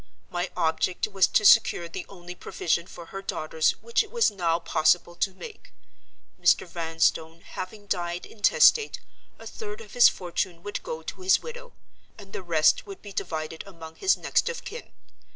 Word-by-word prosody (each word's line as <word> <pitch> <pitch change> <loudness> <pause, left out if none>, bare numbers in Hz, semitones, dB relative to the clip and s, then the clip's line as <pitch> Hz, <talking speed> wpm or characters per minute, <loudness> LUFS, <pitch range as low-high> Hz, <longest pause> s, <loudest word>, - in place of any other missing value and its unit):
My 175 +1 -2
object 160 +4 0
was 195 -3 +3
to 215 - +2
secure 170 -3 +5
the 170 - -7
only 180 -2 -10
provision 170 -1 -2
for 170 - -11
her 195 - -5
daughters 155 -4 0
which 235 +1 +2
it 430 - -14
was 470 - +3
now 170 -4 0
possible 170 +1 +2
to 190 +1 -1
make. 435 - -11 0.7
Mr. - - +4
Vanstone 165 -1 -1
having 205 +4 -8
died 175 -2 -2
intestate, 445 - +4 0.4
a - - -13
third 420 -1 -7
of 460 - -12
his 245 -2 +8
fortune 175 -1 -4
would 205 - -4
go 160 0 -6
to 185 - -7
his 185 0 +3
widow; 485 +1 -9 0.4
and 200 -2 -14
the - - -4
rest 160 -4 +2
would 395 -1 -10
be 205 -1 -9
divided 160 -2 -4
among 165 -4 -11
his 390 - +3
next - - +1
of 475 - -6
kin. 470 +3 -8
180 Hz, 170 wpm, -26 LUFS, 165-215 Hz, 0.7 s, his